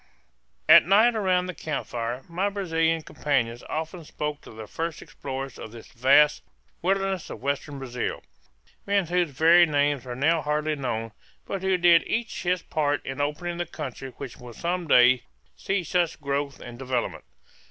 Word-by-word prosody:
At - - +8
night 220 +5 +5
around 185 -4 +1
the 185 - -5
camp 155 -1 -4
fire 120 +2 -4
my 185 +4 -1
Brazilian 165 -5 0
companions 120 -7 -1
often 160 +2 -4
spoke 150 -1 -5
of - - -12
the 110 0 -8
first 165 +7 -4
explorers 135 -3 -7
of 110 - -8
this 115 -1 -12
vast 140 +4 +4 0.4
wilderness 195 -1 0
of - - -7
western 140 +1 -2
Brazil 125 -2 -4 0.6
men 200 -2 +2
whose 175 0 +1
very 165 +5 +5
names 145 -2 +1
are 125 - -4
now 155 +5 +2
hardly 150 +1 -1
known, 115 -5 -3 0.3
but 195 - -4
who 190 -1 +2
did 170 -1 +6
each 230 0 -2
his 180 0 0
part 145 -2 -1
in 135 +1 -4
opening 170 +4 -2
the 175 -1 -3
country 135 -5 -6
which 135 -4 -8
will 125 -1 -11
some 175 +6 -2
day 125 -2 +6 0.3
see 195 -1 -1
such 175 -1 0
growth 140 -1 -2
and 120 0 -10
development. 130 -2 -3
150 Hz, 165 wpm, -26 LUFS, 135-175 Hz, 0.6 s, At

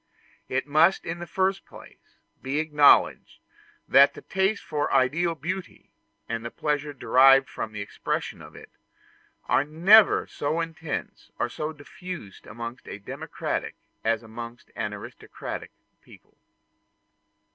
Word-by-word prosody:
It 135 - -1
must 155 +6 +3
in 165 +1 -4
the 175 - -7
first 190 +3 0
place, - - -16 0.2
be 135 +2 -2
acknowledged 150 -2 +4 0.5
that 140 +1 +6
the - - -11
taste 195 +2 0
for 155 -3 -2
ideal 155 +6 +2
beauty, 180 +5 -6 0.3
and 115 0 -3
the 115 - -4
pleasure 150 +2 -2
derived 135 0 +5
from 110 - -5
the 105 -1 -6
expression 100 - -4
of - - -13
it, - - -13 0.8
are - - +3
never 180 +9 +5
so 155 +3 -2
intense 165 - -5
or 120 - -1
so 150 +5 -4
diffused 155 - -10
amongst 115 +2 -8
a - - -6
democratic 100 - -5 0.3
as 115 0 0
amongst 115 +2 -9
an 105 -2 -3
aristocratic 105 -1 -8 0.3
people. - - -19
145 Hz, 130 wpm, -26 LUFS, 120-165 Hz, 0.8 s, that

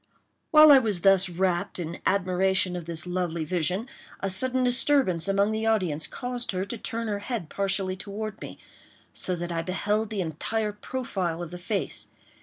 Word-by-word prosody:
While 305 -1 +8
I 275 - +9
was 210 -8 -1
thus 195 -1 +5
wrapped 175 0 -1
in 170 -1 -5
admiration 185 -1 +1
of 175 -2 -5
this 165 -1 -3
lovely 175 -3 -2
vision, 180 - -1 0.3
a 195 - -1
sudden 255 +6 +4
disturbance 245 - +3
among 200 +2 +2
the 220 +1 -1
audience 180 -9 +1
caused 245 -2 -4
her 185 +1 -2
to 215 +4 -4
turn 230 +1 -2
her 205 -1 -2
head 205 -6 -4
partially 195 -1 -1
toward 210 +2 -6
me, - - -8 0.6
so 180 - -2
that 175 0 -5
I 165 -1 -1
beheld 205 +5 -1
the 210 -3 -2
entire 210 +7 -2
profile 190 -7 -3
of 170 - -8
the 180 - -7
face. 195 +3 -3
195 Hz, 175 wpm, -26 LUFS, 175-220 Hz, 0.6 s, I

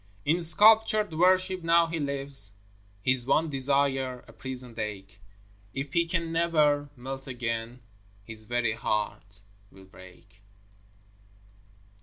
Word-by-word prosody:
In 165 +4 +1
sculptured 215 +3 +5
worship 185 +2 +2
now 170 0 +3
he 165 0 -4
lives, 140 -7 +3 0.5
His 130 0 +1
one 155 +2 +1
desire 135 -2 -1
a - - -15
prisoned 125 -3 -5
ache; 100 -2 -7 0.5
If 135 +1 -5
he 170 0 +1
can 170 -1 -2
never 150 -4 +1
melt 135 +2 -8
again 120 -1 -5 0.4
His 110 +1 -7
very 120 0 -2
heart 105 -2 -4 0.3
will 95 0 -17
break. 95 +2 -18
135 Hz, 115 wpm, -27 LUFS, 115-165 Hz, 0.5 s, sculptured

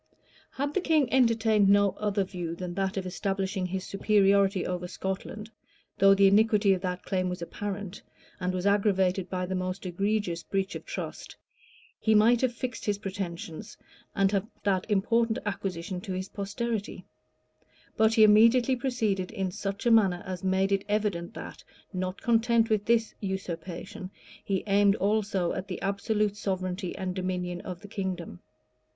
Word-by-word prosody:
} - - -30
Had 285 +2 -1
the 380 - +1
king 310 -8 +2
entertained 225 -5 +4
no 200 0 +5
other 205 -1 +1
view 175 -3 -5
than 180 0 -5
that 195 +1 -2
of 190 - -2
establishing 190 0 -2
his 185 +1 -3
superiority 195 -1 +2
over 180 0 -3
Scotland, 195 +4 -5 0.5
though 195 0 +7
the 200 0 +5
iniquity 210 0 +5
of 185 - -2
that 180 -1 -3
claim 185 -2 -1
was 180 - -4
apparent, 200 +2 -5 0.4
and 180 0 -1
was 185 0 -3
aggravated 190 -2 +2
by 185 -1 -2
the 185 - -4
most 185 +1 -3
egregious 190 -1 -1
breach 195 +2 -2
of - - -8
trust, - - -6 0.6
he 220 -1 +3
might 230 +3 +5
have 255 -2 +2
fixed 245 0 -5
his 205 -1 0
pretensions, 195 -1 -6 0.4
and 195 0 +3
have 200 -2 +2
left - - -30
that 195 0 0
important 225 +3 +2
acquisition 185 -2 -4
to 195 -1 -5
his 185 +1 -4
posterity: 210 +1 -4 0.9
but 220 0 +3
he 220 - +7
immediately 230 +5 +6
proceeded 225 -8 -1
in 190 -4 -3
such 195 +3 -4
a 240 - +4
manner 195 -6 +4
as 185 -1 -5
made 190 +1 +1
it 195 0 +1
evident 205 -5 -1
that, - - -8 0.3
not 185 0 -3
content 230 -1 +3
with 210 -1 +1
this 230 -1 +2
usurpation, 185 -2 -5 0.3
he 195 -2 -1
aimed 200 0 +4
also 200 -3 0
at 185 +1 -5
the - - -5
absolute 205 +1 0
sovereignty 185 -2 -3
and 185 -1 -3
dominion 180 -1 -3
of 180 -2 -7
the 205 - -10
kingdom. 185 - -4
195 Hz, 165 wpm, -28 LUFS, 185-215 Hz, 0.9 s, though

